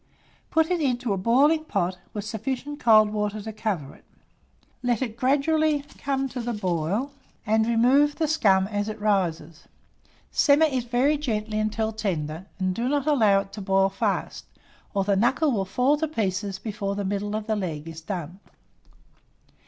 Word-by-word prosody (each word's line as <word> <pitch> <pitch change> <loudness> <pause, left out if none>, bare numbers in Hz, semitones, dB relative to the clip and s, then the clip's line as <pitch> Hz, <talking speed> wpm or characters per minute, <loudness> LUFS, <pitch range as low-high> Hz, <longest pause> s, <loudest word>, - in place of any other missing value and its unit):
Put 320 +1 +2
it 350 -2 +1
into 245 -5 0
a - - -1
boiling 275 - +3
pot, 180 - -1
with 205 -2 -5
sufficient 260 +6 -4
cold 215 -2 +5
water 210 0 -2
to 220 +1 -7
cover 200 -10 -3
it; - - -20 0.8
let 245 -3 +1
it 225 -4 -5
gradually 290 +4 +2 0.2
come 270 -1 -1
to 245 -2 -4
a - - -1
boil, 190 - -1 0.3
and 220 +1 +2
remove 260 +6 +4
the 315 -1 0
scum 200 -12 +3
as 205 0 -2
it 215 0 -6
rises. 170 -6 -1 0.6
Simmer 295 +2 +4
it 260 -5 -1
very 275 +5 +2
gently 215 -6 -2
until 220 +1 -1
tender, 180 -5 -3
and 185 -1 0
do 235 +6 -1
not 285 -1 0
allow 220 -10 +4
it 195 0 -13
to 205 - -6
boil 195 0 +2
fast, 195 - -2 0.5
or 195 - +2
the 200 0 +1
knuckle 265 +9 +2
will 200 -5 0
fall 250 +9 +2
to 315 +1 -1
pieces 200 -7 -2
before 200 -1 -4
the 200 0 -3
middle 205 +2 -2
of 215 -1 -3
the 220 0 0
leg 165 -6 -4
is 165 0 -8
done. 175 0 -6
215 Hz, 170 wpm, -25 LUFS, 195-265 Hz, 0.8 s, cold